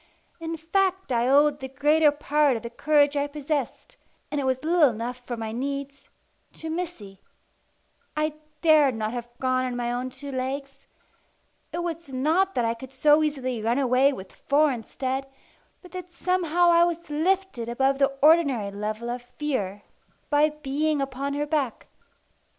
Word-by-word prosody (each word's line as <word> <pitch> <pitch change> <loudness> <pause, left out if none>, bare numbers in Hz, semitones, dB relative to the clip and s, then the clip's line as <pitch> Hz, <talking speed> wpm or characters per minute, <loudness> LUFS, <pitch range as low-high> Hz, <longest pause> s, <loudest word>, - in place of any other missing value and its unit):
In 330 0 -4
fact 375 +1 0
I 240 0 +2
owed 290 +2 +4
the 265 - -5
greater 295 +4 +3
part 295 -2 +2
of 225 - -9
the 235 - -6
courage 290 +2 +3
I 285 0 +1
possessed 290 -2 -4 0.3
and 295 -1 -1
it - - -2
was 260 +1 0
little 325 -2 +5
enough 240 +2 -5
for 240 - -3
my 220 -1 -4
needs 275 +3 -5 0.4
to 320 0 -6
Missy. 315 - -6 1.0
I 305 0 0 0.3
dared 300 -6 +5
not 215 -1 -2
have 240 -1 -5
gone 255 0 +1
on 250 -1 -2
my 240 0 -2
own 250 +1 -2
two 275 +2 -9
legs. 275 +1 -5 0.8
It 345 - -3
was 335 -3 -5
not 320 +9 +1
that 245 - +1
I 230 - +1
could 255 +3 -11
so 295 +3 +4
easily 260 -6 -1
run 230 +3 +1
away 265 +1 +4
with 190 -8 -8
four 295 +1 +2
instead, 260 +3 -3 0.6
but 360 - -14
that 360 -1 -8
somehow 350 -1 +2
I 340 0 +6
was 340 -2 -2
lifted 330 -6 0
above 270 +3 +1
the 275 0 +4
ordinary 285 -10 +4
level 215 +3 -4
of 240 +1 -3
fear 245 -6 -4 0.5
by 295 +1 +4
being 300 +1 -1
upon 275 +1 -3
her 295 +1 -1
back. 290 -6 -2
280 Hz, 165 wpm, -25 LUFS, 250-310 Hz, 1.0 s, I